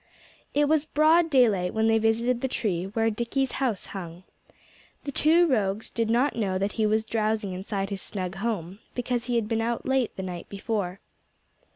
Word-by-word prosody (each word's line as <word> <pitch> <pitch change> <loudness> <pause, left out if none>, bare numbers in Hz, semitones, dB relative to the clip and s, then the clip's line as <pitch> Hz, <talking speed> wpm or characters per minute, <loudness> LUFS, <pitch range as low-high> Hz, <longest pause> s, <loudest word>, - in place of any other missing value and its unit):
It 290 0 +4
was 310 -1 +3
broad 315 +2 +4
daylight 220 - +3
when 220 0 +2
they 225 0 +4
visited 230 +2 +1
the 265 - 0
tree 190 -8 -1
where 225 +3 0
Dickie's 240 +4 -1
house 235 -8 0
hung. 175 -2 -7 0.8
The 285 - -4
two 325 +5 +4
rogues 215 - 0
did 230 -1 -1
not 250 +5 +2
know 195 -5 0
that 200 +2 -1
he 220 -1 +1
was 220 +1 +1
drowsing 215 -3 -1
inside 195 +1 -3
his 195 -2 -3
snug 185 -2 -4
home, 195 -4 -3 0.2
because 245 -1 -1
he 245 0 -1
had 230 -3 +1
been 225 0 0
out 235 +1 -2
late 265 -3 +1
the 190 - -5
night 180 -2 -6
before. 200 -2 -3
225 Hz, 185 wpm, -26 LUFS, 195-245 Hz, 0.8 s, It